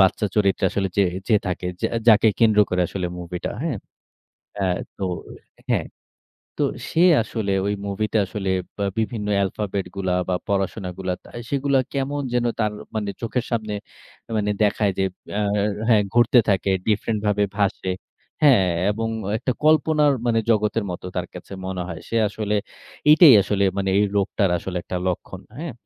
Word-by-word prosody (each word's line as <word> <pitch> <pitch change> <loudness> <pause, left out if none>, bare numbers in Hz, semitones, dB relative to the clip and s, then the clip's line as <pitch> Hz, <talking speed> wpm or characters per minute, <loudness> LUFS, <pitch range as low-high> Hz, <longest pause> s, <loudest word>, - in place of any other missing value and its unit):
বাচ্চা 95 +2 +3
চরিত্র 100 -2 +2
আসলে 95 -1 -1
যে 100 - +5 0.2
যে 110 - +5
থাকে, 90 0 -3 0.2
যা - - +2 0.2
যাকে 110 0 +7
কেন্দ্র 110 -2 +4
করে 90 - +1
আসলে 90 -2 -3
মুভিটা, 90 0 -5
হ্যাঁ? 160 -7 -1 0.8
অ্যা 100 -2 0 0.3
তো 95 - -2 0.7
হ্যাঁ। - - +1 0.7
তো - - +2 0.3
সে 165 - +2 0.2
আসলে 110 -3 -3
ওই 100 - 0
মুভিটা 105 +2 -1
আসলে 95 0 -3 0.3
বা 100 - -1
বিভিন্ন 110 -1 -2 0.2
alphabet 100 0 -3
গুলা 95 -2 0
বা, 90 - +1
পড়াশোনাগুলা, 95 -2 -2
তা - - -15 0.2
সেগুলো 140 0 +1 0.2
কেমন 140 +1 -1
যেন 120 - +2 0.2
তার 105 -1 +1 0.2
মানে 105 -2 -1
চোখের 115 +2 -1
সামনে 110 -3 -2 0.6
মানে 105 -1 0
দেখায় 105 -1 +1
যে 95 - +2 0.3
আ - - +1 0.5
হ্যাঁ, 110 -3 +5
ঘুরতে 120 +1 +5
থাকে 95 0 +1 0.2
ডিফরেন্ট 110 0 0
ভাবে 105 0 +2
ভাসে। 100 -2 0 0.5
হ্যাঁ, 130 -11 +6 0.2
এবং 115 +2 -2 0.3
একটা 130 +2 -1
কল্পনার 155 -1 +4
মানে 115 -1 +3
জগতের 110 0 +1
মতো 90 +1 -6
তার 90 -1 -1
কাছে 90 - -10
মনে 95 -1 -3
হয়। 85 -3 -6
সে 115 - -2
আসলে 105 0 -2 0.6
এটাই 155 -5 +9
আসলে 100 0 0
মানে 95 -1 0
এই 105 - +4
লোকটার 100 -1 +1
আসলে 90 +2 -5
একটা 90 - -5
লক্ষণ। 90 +1 -3 0.2
হ্যাঁ, 165 -2 -5
105 Hz, 160 wpm, -23 LUFS, 95-115 Hz, 0.8 s, এটাই